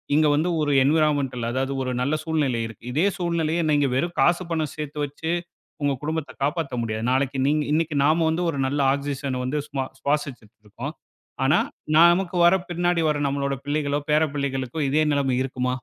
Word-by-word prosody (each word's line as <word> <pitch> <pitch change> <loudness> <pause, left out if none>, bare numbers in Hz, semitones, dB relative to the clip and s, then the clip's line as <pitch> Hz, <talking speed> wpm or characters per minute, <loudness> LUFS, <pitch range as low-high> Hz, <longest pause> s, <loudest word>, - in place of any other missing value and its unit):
இங்க 155 0 +4
வந்து 160 +4 +1
ஒரு 145 -1 +1
என்விரான்மென்டல் 140 -5 +1
அதாவது 135 +2 -1
ஒரு 130 -1 -2
நல்ல 140 +4 0
சூழ்நிலை 150 -7 0
இருக்கு. 115 0 -13
இதே 155 +7 +1
சூழ்நிலைய 170 -2 0
நீங்க 145 -2 +3
வெறும் 170 +6 -1
காசு 175 +1 +3
பணம் 155 -3 -1
சேர்த்து 150 -1 -6
வச்சு 155 +3 -4 0.5
உங்க 140 -1 +1
குடும்பத்தைக் 155 -2 -4
காப்பாத்த 145 -2 -1
முடியாது. 110 -1 -3
நாளைக்கு 135 0 0
நீங்க 150 +1 +2
இன்னைக்கு 160 -1 0
நாம 160 +3 +3 0.2
ஒரு 145 - -3
நல்ல 145 +2 -1
ஆக்ஸ்சிசன் 140 -2 -3
வந்து 145 +4 -1
சுமா 135 -2 -3
சுவாசிச்சிட்டு 140 -7 -3
இருக்கோம். 125 +9 -6 0.5
ஆனா, 145 +6 +4 0.4
நமக்கு 175 +2 +5
வர 175 +2 +6
பின்னாடி 175 0 +1
வர 150 - +1
நம்மளோட 140 0 -1
பிள்ளைகளோ, 145 -1 0
பேரப்பிள்ளைகளுக்கும் 140 -2 0
இதே 155 +2 +3
நிலைமை 135 -3 +1
இருக்குமா? 125 -1 -2
145 Hz, 165 wpm, -24 LUFS, 135-160 Hz, 0.5 s, வர